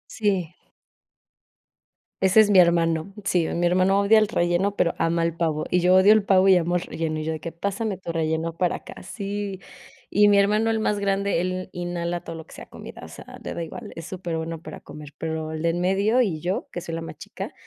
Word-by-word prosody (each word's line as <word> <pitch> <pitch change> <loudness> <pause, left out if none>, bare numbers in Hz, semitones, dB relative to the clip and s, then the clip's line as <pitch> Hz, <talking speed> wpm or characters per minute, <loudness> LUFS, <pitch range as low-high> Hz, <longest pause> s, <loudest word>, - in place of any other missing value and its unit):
Sí. 190 -6 -1 1.7
Ese 190 +3 +5
es 210 -1 +5
mi 190 - +7
hermano. 170 +1 +2
Sí, 175 -4 +1
mi 175 +1 -1
hermano 185 +3 +3
odia 215 +2 +5
el 215 - +2
relleno, 185 0 0
pero 170 - +1
ama 165 0 +1
el 165 0 0
pavo. 160 -3 -1
Y 180 - +3
yo 180 +1 +4
odio 195 +3 +7
el 215 - +4
pavo 190 -1 +4
y 190 - +7
amo 175 0 +1
el 180 - 0
relleno. 155 -1 -3
Y - - -4
yo 160 - -2
de 160 - -4
que 165 +2 -6
pásame 200 +4 -3
tu 175 -2 -6
relleno 160 0 -1
para 175 +1 0
acá. - - -10
Sí, 200 -2 -5 0.5
y 205 +1 +5
mi 205 - +5
hermano, 210 +3 +3
el 225 0 +1
más 210 -1 0
grande, 200 -2 0
él 185 0 -3
inhala 175 0 -3
todo 165 - -7
lo 160 - -9
que - - -16
sea - - -11
comida, - - -11
o - - -10
sea, - - -12
le - - -5
da 170 - -3
igual, 160 - -8
es 165 - -8
superbueno 165 -3 -5
para - - -10
comer, 150 -1 -11
pero 160 -1 -4
el 155 - -5
de 170 - +2
en 170 +1 -1
medio 200 +7 +2
y 175 -10 -1
yo, 180 +3 -2
que 175 - -5
soy 165 -1 -7
la 165 - -4
más 165 - -8
chica, - - -8
180 Hz, 230 wpm, -24 LUFS, 165-200 Hz, 1.7 s, mi